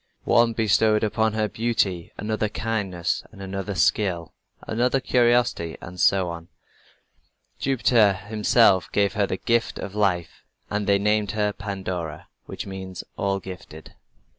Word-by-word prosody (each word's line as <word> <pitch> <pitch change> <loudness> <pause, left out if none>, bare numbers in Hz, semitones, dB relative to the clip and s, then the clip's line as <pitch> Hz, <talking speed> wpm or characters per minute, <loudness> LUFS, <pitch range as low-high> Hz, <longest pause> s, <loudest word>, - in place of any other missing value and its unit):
One 120 -1 +4
bestowed 110 0 +3
upon 110 0 +1
her 110 -1 0
beauty, 105 -6 -1
another, 110 0 -1
kindness, 105 -6 -2
another, 95 -1 -5
skill, 90 -3 +1 0.3
another, 125 +4 +1
curiosity, 120 -10 +2
and 90 +1 -10
so 95 -1 +3
on. 85 0 -8 1.1
Jupiter 120 -6 +3
himself 105 0 +2
gave 100 -1 +2
her 105 -2 +1
the 95 - -2
gift 115 +2 0
of 100 - -6
life, 95 -5 0 0.3
and 105 -1 -1
they 100 0 +4
named 105 0 +1
her 105 -1 0
Pandora, 90 -7 -5 0.2
which - - -6
means 95 -1 -7
"all 100 0 -1
gifted." 90 -4 -10
100 Hz, 130 wpm, -24 LUFS, 95-110 Hz, 1.1 s, One